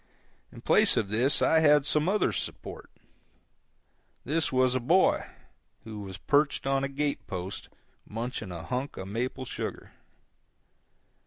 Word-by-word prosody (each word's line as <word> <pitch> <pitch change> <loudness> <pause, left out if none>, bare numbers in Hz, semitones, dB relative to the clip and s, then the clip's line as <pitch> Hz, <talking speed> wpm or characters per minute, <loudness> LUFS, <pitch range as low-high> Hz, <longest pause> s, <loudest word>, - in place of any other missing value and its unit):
In - - -12
place - - +4
of 100 - 0
this 120 +7 +2
I 160 - +4
had 150 -2 +5
some 150 +3 +1
other 210 +1 +2
support. - - -6 1.4
This 155 +3 0
was 130 -1 +3
a 130 - +1
boy, 170 +10 +3 0.6
who 110 -2 -8
was 95 -2 -7
perched 145 -1 +1
on 135 0 +1
a 140 - -1
gate 145 +1 -2
post 95 +1 -6 0.3
munching 115 -2 -5
a 85 -2 -7
hunk 130 +3 -4
of 95 - -6
maple 125 +4 -3
sugar. - - -6
130 Hz, 140 wpm, -28 LUFS, 110-145 Hz, 1.4 s, had